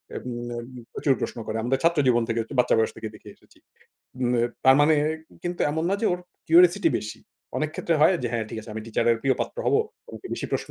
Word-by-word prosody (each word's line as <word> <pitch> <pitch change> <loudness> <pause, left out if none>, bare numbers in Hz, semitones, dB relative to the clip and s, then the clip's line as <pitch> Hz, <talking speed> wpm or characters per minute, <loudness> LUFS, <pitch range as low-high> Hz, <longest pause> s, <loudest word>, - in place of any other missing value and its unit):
এব - - -5 0.3
নেব 120 0 -5 0.3
প্রচুর 140 - +2
প্রশ্ন - - -3
করে। 110 - -2
আমরা 130 +3 +1
ছাত্র 170 -2 +3
জীবন 120 -2 +4
থেকে 115 0 -1
আরকি 115 - -8
বাচ্চা 125 - +4
বয়স 110 - +2
থেকে 110 - -5
দেখে 105 - -13
এসেছি। - - -25 0.8
মেব 120 0 +1
তার 130 +1 +7
মানে 155 +2 +5 0.5
কিন্তু 175 0 -3
এমন 160 +2 -1
না - - +2
যে 225 - +1
ওর 180 - -2 0.3
কিউরিওসিটি 175 +2 +6
বেশি। 105 - -7 0.4
অনেক 155 0 -1
ক্ষেত্রে 165 - 0
হয় 170 +5 +6
যে 120 - -1
হ্যাঁ 115 -2 -1
ঠিক 110 - -5
আছে 110 - -11
আমি 110 - -4
টিচারের 115 +1 +2
প্রিয় 135 -1 +3
পাত্র - - -3
হব। - - +3 0.4
ওনাকে 380 - -9
বেশি - - -4
প্রশ্ন - - -2
130 Hz, 225 wpm, -25 LUFS, 115-165 Hz, 0.8 s, তার